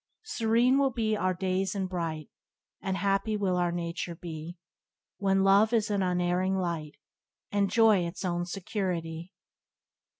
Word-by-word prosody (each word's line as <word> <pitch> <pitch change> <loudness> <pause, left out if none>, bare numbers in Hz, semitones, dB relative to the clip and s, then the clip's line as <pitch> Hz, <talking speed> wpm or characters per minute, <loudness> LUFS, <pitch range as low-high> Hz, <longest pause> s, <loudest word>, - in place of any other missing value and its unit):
Serene 240 - +2
will 275 -1 +3
be 225 -3 0
our 185 -3 0
days 190 +1 -1
and 190 -2 -1
bright, 165 -4 -3 0.5
And 190 0 -2
happy 200 +2 0
will 190 -3 0
our 175 -1 +1
nature 170 0 -4
be, 165 0 -7 0.6
When 195 -1 +2
love 200 +4 +5
is 220 -2 +2
an 200 -1 +1
unerring 180 +1 +1
light, 170 -5 -3 0.6
And 200 -1 +2
joy 225 -3 +5
its 185 +3 -6
own 175 -1 -1
security." 175 -3 -3
190 Hz, 140 wpm, -29 LUFS, 175-205 Hz, 0.6 s, love